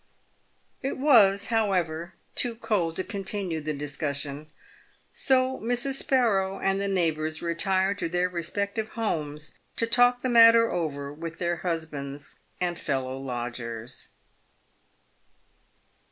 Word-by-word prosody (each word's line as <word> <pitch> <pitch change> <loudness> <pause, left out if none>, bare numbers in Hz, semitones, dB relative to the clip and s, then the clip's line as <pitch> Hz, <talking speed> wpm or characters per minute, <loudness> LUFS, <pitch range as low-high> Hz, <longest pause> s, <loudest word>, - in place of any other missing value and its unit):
It 270 - -2
was, 205 -8 +5
however, 180 -6 0 0.2
too 240 -2 +1
cold 180 -8 -1
to 185 - -1
continue 195 -5 -3
the 155 +1 -3
discussion; 145 0 -4 0.6
so 260 0 +2
Mrs. 245 +4 0
Sparrow 195 -7 +1
and 195 0 +1
the 200 - -1
neighbours 160 -4 -1
retired 190 +3 0
to - - -2
their 180 +1 +1
respective 200 +5 -3
homes 150 -9 -3 0.2
to 230 - +2
talk 245 +1 +4
the - - -1
matter 230 -1 +7
over 145 -5 -3
with 165 +2 -7
their 175 -1 -1
husbands 155 -5 -5 0.2
and 175 -1 -1
fellow 130 -2 -2
lodgers. 120 -2 -5
175 Hz, 115 wpm, -27 LUFS, 150-215 Hz, 0.6 s, matter